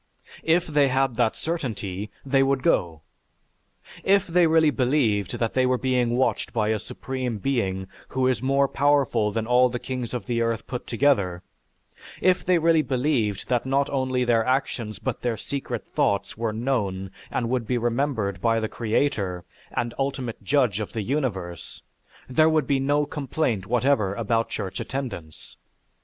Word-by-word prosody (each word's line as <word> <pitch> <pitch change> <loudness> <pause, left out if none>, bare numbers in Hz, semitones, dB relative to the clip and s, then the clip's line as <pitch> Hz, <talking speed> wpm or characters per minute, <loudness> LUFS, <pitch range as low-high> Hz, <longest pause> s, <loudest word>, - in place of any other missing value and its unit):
If 170 +2 +2
they 150 -3 +3
had 135 -1 +1
that 120 -3 +2
certainty 105 - -4 0.2
they 135 0 +3
would 135 -1 +1
go. 85 - +1 1.0
If 200 0 +4
they 175 0 +3
really 160 -1 +4
believed 125 -8 +1
that 115 -1 -1
they 130 -1 +3
were 130 0 +2
being 125 -2 +1
watched 130 - 0
by 110 -3 +1
a 110 -1 +1
Supreme 130 +1 -4
Being 95 -6 -1 0.2
who 130 -1 -1
is 130 -4 +1
more 135 +1 +2
powerful 135 -7 +2
than 110 +1 -2
all 125 +2 +4
the 120 - -3
kings 125 -1 -4
of 120 - -4
the 120 -2 -1
earth 115 -1 -1
put 125 -1 -6
together, 100 -9 +1 0.8
if 185 0 +3
they 180 -1 +3
really 165 -1 +4
believed 125 -6 0
that 125 0 +1
not 135 +1 +1
only 130 -2 0
their 115 -2 +3
actions 120 -4 -1
but - - -4
their 120 -2 -1
secret 140 +6 -4
thoughts 100 0 0
were 115 0 -1
known 105 -5 -2 0.2
and 120 -1 -2
would 125 -4 -1
be 125 - +1
remembered 120 -6 -1
by 115 +1 +2
the 110 - -1
creator, 105 -6 -1 0.3
and 120 -1 -2
ultimate 135 -4 -3
judge 125 -8 +2
of 105 - -5
the 110 - -2
universe, 95 - -3 0.4
there 155 +5 +4
would 155 -3 +2
be 135 +1 +1
no 145 +2 +2
complaint 135 -8 -2
whatever 120 -5 +2
about 115 +1 0
church 95 -3 -4
attendance. 120 - -6
125 Hz, 165 wpm, -25 LUFS, 110-140 Hz, 1.0 s, If